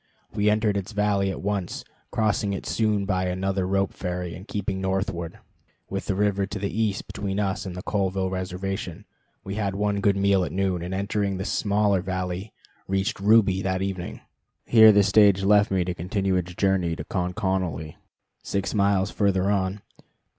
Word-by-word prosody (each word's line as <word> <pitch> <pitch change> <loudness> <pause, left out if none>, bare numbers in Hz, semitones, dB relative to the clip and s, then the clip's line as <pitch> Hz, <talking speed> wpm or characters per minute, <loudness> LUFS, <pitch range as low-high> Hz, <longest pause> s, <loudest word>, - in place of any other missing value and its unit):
We 105 0 +2
entered 105 -1 +2
its 100 +2 -5
valley 100 -1 +1
at 95 - -5
once, 100 -3 -2 0.3
crossed 110 -2 +1
it 100 -2 -2
soon 105 -3 +1
by 95 -2 0
another 95 +1 -1
rope 95 0 0
ferry, 90 -1 -4
and 95 +5 -10
keeping 100 -1 -3
northward, 95 -3 -2 0.5
with 95 0 -3
the 100 - 0
river 100 -1 +1
to 105 - -5
the 100 0 -3
east 110 -3 0
between 100 0 -3
us 100 0 -1
and 90 - -6
the 90 - -6
Colville 95 -2 -1
Reservation, 95 +1 -4 0.4
had 100 -1 -2
one 100 0 0
good 100 0 +2
meal 100 -1 +3
at - - -3
noon, 95 -2 0
and 90 +2 -4
entering 100 -1 -1
a 95 - -3
smaller 100 -3 +1
valley, 95 +2 -4 0.4
reached 95 +5 -1
Ruby 100 -2 +4
that 95 0 -1
evening. 95 -2 -4 0.4
Here 110 -2 +8
the 105 -1 +5
stage 100 -1 +5
left 105 +1 +4
me 95 -2 +1
to 90 - -2
continue 95 +2 -1
its 90 -1 -2
way 95 -4 +2
to - - -6
Conconally, 90 -4 -2 0.5
six 100 0 -2
miles 100 -1 +2
further 100 -1 +1
on. 95 0 -1
95 Hz, 170 wpm, -25 LUFS, 95-100 Hz, 0.5 s, Here